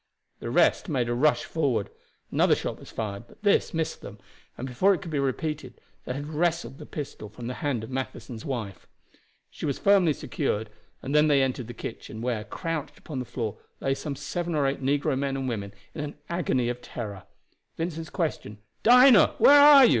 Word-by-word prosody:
The - - -5
rest - - +3
made 130 -6 0
a - - +1
rush 145 +5 +3
forward. 130 -10 -1 0.4
Another - - +4
shot - - -4
was - - -12
fired, 105 0 -5
but 210 - -20
this 205 - +3
missed 160 -2 -2
them, 100 +1 -9 0.4
and 130 - -5
before 185 +11 +3
it - - -8
could 170 - -7
be 145 - 0
repeated 140 -1 -3 0.3
they - - -3
had 145 +1 -4
wrested 155 -4 -1
the - - -10
pistol 135 -7 -6
from 120 - -9
the 125 - -3
hand 135 -7 -1
of 110 - -8
Matheson's 130 -3 -5
wife. 115 -8 -5 0.6
She - - -5
was 140 - -1
firmly 195 -6 +4
secured, 110 -8 -2 0.3
and 135 - -3
they 150 - +6
then 155 - +3
entered 135 -4 +2
the 120 - -8
kitchen, 110 -1 -7
where, 115 -2 -2
crouched 155 - -4
upon 145 -5 -6
the 125 - -4
floor, 115 -3 -4 0.2
lay 135 - 0
some 140 +1 -4
seven 175 +3 -3
or 145 -2 +2
eight 135 +1 -1
negro 140 +2 +1
men 135 0 -1
and 135 -1 -3
women 100 -5 -3 0.2
in 150 - -4
an 150 0 -6
agony 145 -8 0
of 120 0 -3
terror. 100 -6 -7 0.5
Vincent's 165 -1 -4
question, 155 - -3 0.2
"Dinah, 250 -1 +7
where 285 +1 +8
are 285 -2 +10
you?" - - +5
135 Hz, 200 wpm, -27 LUFS, 120-160 Hz, 0.6 s, are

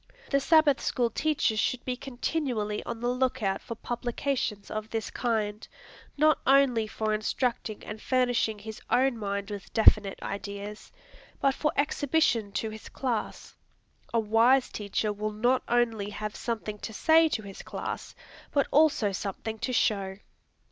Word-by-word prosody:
The 280 - +4
Sabbath 305 -1 +4
School 240 -3 0
teacher 300 -5 +1
should 235 +3 0
be 255 - -1
continually 245 -5 -2
on 235 -1 -5
the 240 - 0
look 250 -2 0
out 195 -1 0
for 230 - -6
publications 240 -2 -3
of 215 0 -4
this 225 -1 -3
kind, 215 -3 -1 0.5
not 310 +1 +4
only 260 -5 +4
for 215 0 -1
instructing 215 0 -1
and 210 +1 -7
furnishing 245 -4 +1
his 215 +1 -9
own 265 0 +3
mind 200 -1 -3
with 205 -1 -7
definite 210 -3 +5
ideas, 200 +1 -6 0.5
but 275 - +3
for 300 +3 0
exhibition 285 -7 +1
to 220 +2 -2
his 215 0 -10
class. 245 -5 -3 0.6
A 230 - +2
wise 230 +4 +4
teacher 210 +1 -2
will 215 +1 -3
not 245 +4 +2
only 230 -4 +1
have 210 0 -5
something 220 -3 -4
to 220 - -6
say 320 +7 +5
to 220 - -2
his 195 -1 -9
class, - - -6 0.4
but 280 -2 +2
also 290 -9 +4
something 205 +3 -4
to 255 - -2
show. 195 -5 +1
225 Hz, 150 wpm, -28 LUFS, 210-255 Hz, 0.6 s, definite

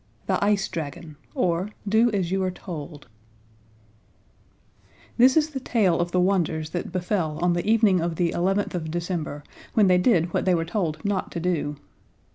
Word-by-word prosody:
The - - 0
Ice 205 -1 +2
Dragon, 160 0 -6 0.2
or 185 -5 0 0.2
Do 220 +4 +4
as 190 -5 -1
You 190 0 +1
Are 185 - +1
Told 155 -6 -8 2.1
This 255 +4 +6
is 310 0 +2
the 270 - -4
tale 210 -9 +1
of 175 0 -1
the 180 - +2
wonders 170 -4 0
that 175 - -4
befell 180 -4 -1
on 175 0 +3
the 175 +4 -1
evening 215 -5 +4
of 170 0 -2
the 170 0 +1
eleventh 195 +4 0
of 165 -3 -3
December, 165 -3 -3 0.3
when 215 - +5
they 180 -1 +4
did 180 -5 +2
what - - 0
they 185 -1 +4
were 165 -1 -1
told 165 -3 -3
not 200 -2 -1
to - - -3
do. 165 -4 -1
180 Hz, 175 wpm, -25 LUFS, 165-200 Hz, 2.1 s, This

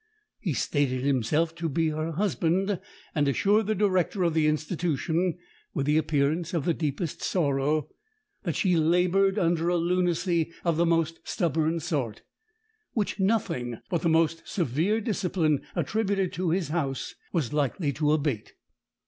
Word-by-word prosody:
He - - -1
stated 130 -4 0
himself 140 +5 +1
to 170 -1 -3
be 160 +2 +1
her 155 +1 -2
husband, 190 +1 0 0.3
and 145 -2 +1
assured 205 +9 +2
the 215 - +1
director 185 -1 +1
of 170 -2 +2
the 155 -1 +3
institution, 160 +2 0 0.4
with 140 -4 0
the 150 +2 +3
appearance 155 +3 0
of 160 - -1
the 170 - +3
deepest 155 0 -3
sorrow, 145 -2 +1 0.5
that - - -2
she 185 -3 +2
laboured 180 +5 +3
under 170 -2 +2
a 175 - +2
lunacy 175 -1 +1
of 170 -2 +2
the 170 0 +3
most 165 -1 +1
stubborn 165 - 0
sort, 140 - -2 0.7
which 210 -2 -1
nothing 190 - 0
but 175 - +1
the 170 - +2
most 165 0 +2
severe 175 - 0
discipline 180 - 0
attributed 200 -4 0
to 180 -1 -1
his 175 0 0
house 145 -5 -2 0.2
was 150 -7 -1
likely 145 +1 0
to 150 0 +1
abate. 145 -8 -1
165 Hz, 150 wpm, -27 LUFS, 150-180 Hz, 0.7 s, the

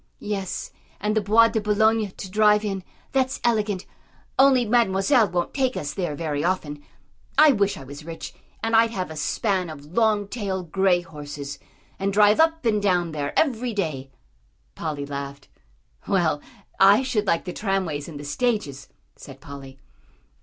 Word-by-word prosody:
"Yes, 200 -3 -4 0.3
and 210 +1 -1
the 215 - +3
Bois 225 +3 +5
de 220 - -1
Boulogne 215 +1 +2
to 190 0 -9
drive 210 +1 +4
in, 195 -2 -3 0.3
that's 265 -1 0
elegant. 210 -5 0 0.5
Only 265 -2 +5
Mademoiselle 225 +1 +3
won't 175 0 -2
take 260 -2 0
us 145 0 -4
there 175 -6 -3
very 150 -2 -2
often. 150 -5 -2 0.5
I 305 -1 +8
wish 200 -5 +1
I - - -9
was 140 +3 -10
rich, 165 +1 -8 0.3
and 225 0 +1
I'd 230 +1 +5
have 185 -7 -4
a - - -7
span 185 +4 -1
of 145 -2 -9
long 215 -2 +2
tailed, 190 -6 -4
grey 190 -1 +3
horses, 145 -3 -8 0.4
and 195 +1 0
drive 210 +1 +5
up 320 -2 +3
and 210 -2 +2
down 180 -4 +1
there 145 -2 -3
every 245 -6 +1
day." 150 -9 -3 0.6
Polly 145 - -4
laughed. 140 0 -7 0.6
"Well, 170 -7 +1 0.4
I 200 +6 +6
should 225 -6 -1
like 165 - +1
the 180 - -5
tram 195 -2 -1
ways 145 -3 -4
and 155 -4 -8
the 145 - -8
stages," 175 - -2 0.3
said 135 -1 -12
Polly. 135 -1 -10
195 Hz, 165 wpm, -24 LUFS, 155-220 Hz, 0.6 s, I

